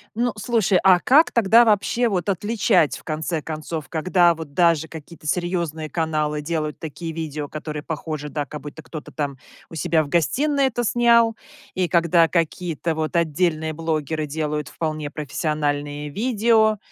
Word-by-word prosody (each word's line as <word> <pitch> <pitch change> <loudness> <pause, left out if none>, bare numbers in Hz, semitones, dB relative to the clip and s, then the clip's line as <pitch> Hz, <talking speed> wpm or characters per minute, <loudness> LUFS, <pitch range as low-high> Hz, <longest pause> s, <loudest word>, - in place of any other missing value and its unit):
Ну, 240 0 0
слушай, 215 -4 +2
а 185 -2 +6
как 290 - +5
тогда 230 0 +5
вообще 225 +2 +2
вот 180 -3 -2
отличать, 200 - +2
в - - -15
конце 160 +1 -2
концов, 155 -1 -5
когда 175 +1 +3
вот 155 -3 -9
даже 165 -2 +3
какие-то 160 0 -11
серьезные 170 -2 -2
каналы 155 -1 -1
делают 155 -1 -3
такие 160 +1 -6
видео, 155 -2 -4
которые 150 0 -6
похожи, 155 -1 -5
да, 145 -1 -3
как 150 +3 -8
будто 150 +1 -9
кто-то 160 -2 -9
там 140 -3 -3 0.3
у - - -10
себя 160 0 +1
в 140 - -9
гостиной 280 - +1
это 240 -2 -1
снял? 235 -1 +4 0.4
И 185 -1 +1
когда 170 0 +4
какие-то 165 -1 -1
вот 155 +2 -3
отдельные 160 -1 +1
блогеры 155 -1 -2
делают 150 -1 -3
вполне 155 -1 -4
профессиональные 145 -1 -2
видео? 220 - +2
160 Hz, 155 wpm, -22 LUFS, 150-185 Hz, 0.4 s, а